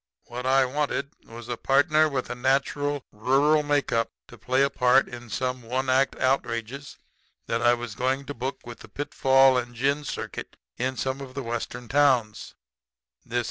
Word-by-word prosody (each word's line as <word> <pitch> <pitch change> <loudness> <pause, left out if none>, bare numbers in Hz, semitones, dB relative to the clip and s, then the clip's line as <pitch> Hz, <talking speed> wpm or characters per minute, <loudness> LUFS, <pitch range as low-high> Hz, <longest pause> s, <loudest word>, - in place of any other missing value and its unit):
"What 125 +2 -6
I 135 0 +4
wanted 140 +1 -2
was 115 0 -10
a 120 -1 -3
partner 155 +5 +3
with 130 -4 -3
a - - -1
natural 140 +2 0
rural 135 +8 +3
make 145 -1 0
up 115 0 0 0.2
to - - -12
play 130 +5 +2
a 140 - +2
part 125 +1 +4
in 120 -1 -10
some 130 +3 -2
little 120 +2 -7
one 130 0 +1
act 135 +1 +2
outrages 130 +1 -2 0.5
that 115 0 -1
I 120 0 +5
was 120 -2 -6
going 130 +4 -1
to 145 - -5
book 135 0 -5
with 120 -2 -9
the - - -13
Pitfall 135 -2 +3
& 120 0 -15
Gin 140 +5 0
circuit 145 - -6 0.2
in 130 +1 -2
some 130 +1 -2
of 130 -1 -9
the 140 - -4
Western 120 +1 -5
towns; 130 -6 +1 0.7
and 120 - -15
this - - +1
R. - - +4
130 Hz, 190 wpm, -26 LUFS, 120-140 Hz, 0.7 s, I